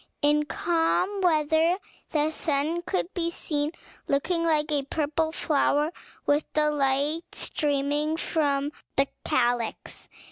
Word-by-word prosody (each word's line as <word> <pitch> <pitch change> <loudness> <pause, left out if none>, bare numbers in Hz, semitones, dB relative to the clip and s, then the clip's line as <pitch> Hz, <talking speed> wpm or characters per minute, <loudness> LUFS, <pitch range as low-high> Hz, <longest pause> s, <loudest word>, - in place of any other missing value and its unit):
In 295 +1 +4
calm 345 +5 0
weather 320 0 +3 0.3
the 305 0 +1
sun 310 +2 0
could 365 +1 -2
be 335 -2 -1
seen, 300 -3 -2 0.4
looking 335 +5 +1
like 310 -2 +2
a 290 -1 +2
purple 310 +3 -1
flower, 300 0 +1 0.3
with 290 +1 +3
the 300 0 +3
light 285 +3 0
streaming 295 +2 0
from 290 -4 0 0.2
the 275 0 +3 0.2
calyx. 240 -1 -1
300 Hz, 115 wpm, -27 LUFS, 290-330 Hz, 0.4 s, In